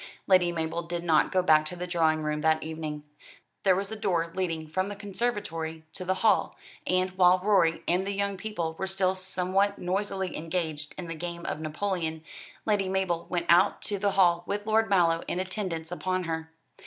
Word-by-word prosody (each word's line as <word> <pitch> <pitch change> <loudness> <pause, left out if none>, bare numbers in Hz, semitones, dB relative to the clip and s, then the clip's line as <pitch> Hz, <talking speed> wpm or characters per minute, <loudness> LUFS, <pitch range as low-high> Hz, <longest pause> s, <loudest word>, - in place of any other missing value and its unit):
Lady 185 -2 +4
Mabel 165 0 -2
did 170 0 -4
not 160 -3 +3
go 185 -1 +2
back 155 -3 +5
to 180 - -4
the 180 0 -4
drawing 160 -3 +1
room 150 0 -1
that 160 +1 +2
evening. 155 -2 -5 0.6
There 190 -2 +4
was 195 +2 -3
a - - -3
door 170 -5 0
leading 165 -4 -2
from 185 +5 -1
the 205 - -5
conservatory 195 -7 -3
to - - -6
the 185 +1 0
hall; 220 - +3 0.3
and, 185 0 +2
while 185 -1 +5
Rorie 185 -4 +2
and 180 +3 +1
the - - 0
young 200 0 -1
people 185 -5 -3
were 190 - -1
still 190 -1 +1
somewhat 185 +2 0
noisily 190 0 -2
engaged 160 -2 -3
in 180 - -5
the 165 - -5
game 170 +1 -6
of - - -3
Napoleon, 160 0 -2 0.4
Lady 205 -3 +1
Mabel 185 -3 -1
went 175 -1 -1
out 180 +4 +4
to 205 -2 -2
the 200 0 +1
hall 175 -3 +4
with 205 +1 -2
Lord 220 0 +2
Mallow 170 -4 +3
in 180 - -2
attendance 185 -4 -4
upon 185 +1 -1
her. 160 -1 -4
180 Hz, 190 wpm, -28 LUFS, 165-190 Hz, 0.6 s, back